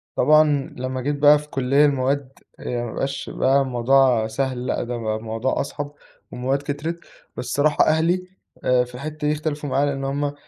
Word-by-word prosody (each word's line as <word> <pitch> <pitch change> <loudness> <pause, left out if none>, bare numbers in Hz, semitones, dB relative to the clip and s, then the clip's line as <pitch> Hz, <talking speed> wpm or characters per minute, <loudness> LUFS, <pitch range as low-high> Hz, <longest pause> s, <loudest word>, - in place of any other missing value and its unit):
طبعًا 150 0 +3
لمّا 130 0 -3
جيت 145 +3 -1
بقى 145 +1 +6
في 150 0 -13
كلّية 135 +3 +3
المواد، 135 -1 -1 0.2
يعني 120 -1 -3
ما 115 - -6
بقاش 140 +1 -3
بقى 135 +2 +2
الموضوع 125 -2 +3
سهل 125 +2 -2
لأ - - -1
ده 120 0 -4
بقى 110 -2 -2
الموضوع 115 +3 -2
أصعب، 145 +1 -5 0.4
والمواد 130 +3 -1
كترِت، 145 +4 -4 0.4
بس - - -4
الصراحة 145 +4 +2
أهلي 170 +4 +1 0.4
آآ 125 -1 +3
في 125 0 -11
الحتّة 150 +3 -4
دي 150 - +2
اختلفوا 150 -1 -3
معايا 140 +2 +2
لإن 135 -1 -2
هُم 140 +1 -1
135 Hz, 180 wpm, -22 LUFS, 125-145 Hz, 0.4 s, بقى